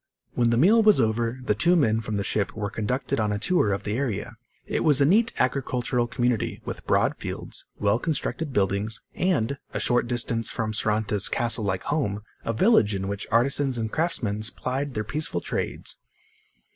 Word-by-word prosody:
When 120 -1 +2
the 115 - +2
meal 205 - +6
was 215 -5 +5
over, 115 +2 0
the 105 - +2
two 170 +12 +3
men 115 -9 +2
from 110 -2 -3
the 100 - -1
ship 100 +1 -1
were 105 -2 -3
conducted 125 +5 -2
on 105 -1 +1
a 105 - 0
tour 110 - +2
of 100 - -2
the 105 - -2
area. 120 -3 -3 0.3
It - - -1
was 150 -4 +4
a 140 - +5
neat 220 +9 +4
agricultural 125 -2 0
community, 120 -2 -1
with - - -7
broad - - +2
fields, - - -5
well 105 +2 +2
constructed 160 0 -2
buildings 100 0 0
and, 140 -8 0 0.2
a - - 0
short 120 -1 +2
distance 115 -2 0
from 110 -2 -2
Saranta's 105 -2 +1
castle 115 -2 0
like 95 -2 -1
home, 110 -9 -1 0.2
a - - -1
village 115 - +4
in 95 0 -3
which 100 0 -4
artisans 130 +3 +2
and 110 -1 -2
craftsmen 125 -11 -1
plied 135 +2 -3
their 110 - -1
peaceful 150 +9 -2
trades. - - -3
120 Hz, 185 wpm, -25 LUFS, 105-140 Hz, 0.3 s, meal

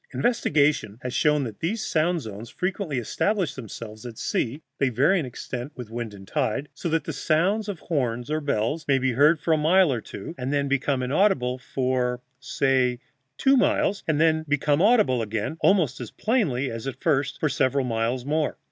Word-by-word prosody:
Investigation 150 - +1
has 125 -1 -4
shown 150 +1 +2
that 115 -5 -6
these 200 +7 -2
sound 165 +2 +1
zones 110 -1 -8
frequently 180 - -3
establish 180 - 0
themselves 110 -2 -9
at 120 -3 -8
sea 130 +5 -2 0.2
(they 135 - +3
vary 140 - +3
in 145 - -3
extent 125 +2 -6
with 120 -4 -8
wind 120 -1 -4
and 95 -1 -13
tide), 145 0 -1
so 170 - -4
that 160 -1 +1
the 160 - -5
sound 180 +10 +1
of 185 -6 -5
horn 125 -7 -1
or 155 +1 -1
bell 145 +2 -1
may 135 -1 +4
be 130 0 +1
heard 145 +6 +4
for 165 - -1
a - - +3
mile 165 0 +4
or 120 - -3
two, 100 - -8
and 130 +2 -2
then 140 -1 +1
become 140 -1 0
inaudible 130 -4 +1
for, 125 -1 -1 0.2
say, 130 -3 +1 0.4
two 270 +1 +4
miles, 205 -5 +2
and 155 -2 +1
then 160 0 +3
become 145 +1 +2
audible 205 - +4
again, 110 +6 -3
almost 160 -11 +2
as 120 - -6
plainly 150 - 0
as 115 +3 -6
at 135 - -5
first, 140 -3 0
for 155 - +1
several 135 -1 +1
miles 120 +1 -1
more. 155 +1 0
140 Hz, 190 wpm, -25 LUFS, 125-160 Hz, 0.4 s, may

